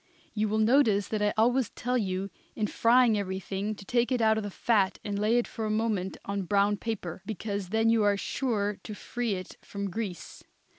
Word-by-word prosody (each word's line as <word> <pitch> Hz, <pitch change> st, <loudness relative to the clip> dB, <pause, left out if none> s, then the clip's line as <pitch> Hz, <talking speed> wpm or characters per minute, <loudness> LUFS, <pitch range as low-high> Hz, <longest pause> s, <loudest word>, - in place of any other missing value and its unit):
You 215 Hz, -1 st, 0 dB
will 215 Hz, -, 0 dB
notice 220 Hz, -3 st, +4 dB
that 215 Hz, -1 st, -1 dB
I 210 Hz, 0 st, +3 dB
always 245 Hz, +2 st, +3 dB
tell 250 Hz, +1 st, -2 dB
you 195 Hz, -4 st, -1 dB, 0.2 s
in 215 Hz, -, 0 dB
frying 230 Hz, 0 st, +4 dB
everything 195 Hz, +2 st, -3 dB
to 200 Hz, -, -12 dB
take 240 Hz, +4 st, +1 dB
it 250 Hz, -, +2 dB
out 220 Hz, -1 st, +4 dB
of 220 Hz, -, -1 dB
the 205 Hz, -, -4 dB
fat 200 Hz, -1 st, +1 dB
and 200 Hz, -1 st, -3 dB
lay 215 Hz, +3 st, +3 dB
it 240 Hz, -, +1 dB
for 225 Hz, -, -6 dB
a 215 Hz, -, -1 dB
moment 215 Hz, -4 st, -1 dB
on 200 Hz, 0 st, -2 dB
brown 200 Hz, +2 st, +2 dB
paper, 195 Hz, -7 st, -4 dB
because 200 Hz, -2 st, -4 dB
then 225 Hz, +2 st, +3 dB
you 230 Hz, -1 st, +3 dB
are 205 Hz, -1 st, +3 dB
sure 210 Hz, -3 st, -1 dB
to 210 Hz, -, -7 dB
free 240 Hz, 0 st, -3 dB
it 185 Hz, -1 st, -8 dB
from 200 Hz, -1 st, -5 dB
grease. 200 Hz, -4 st, -6 dB
210 Hz, 205 wpm, -28 LUFS, 200-225 Hz, 0.2 s, notice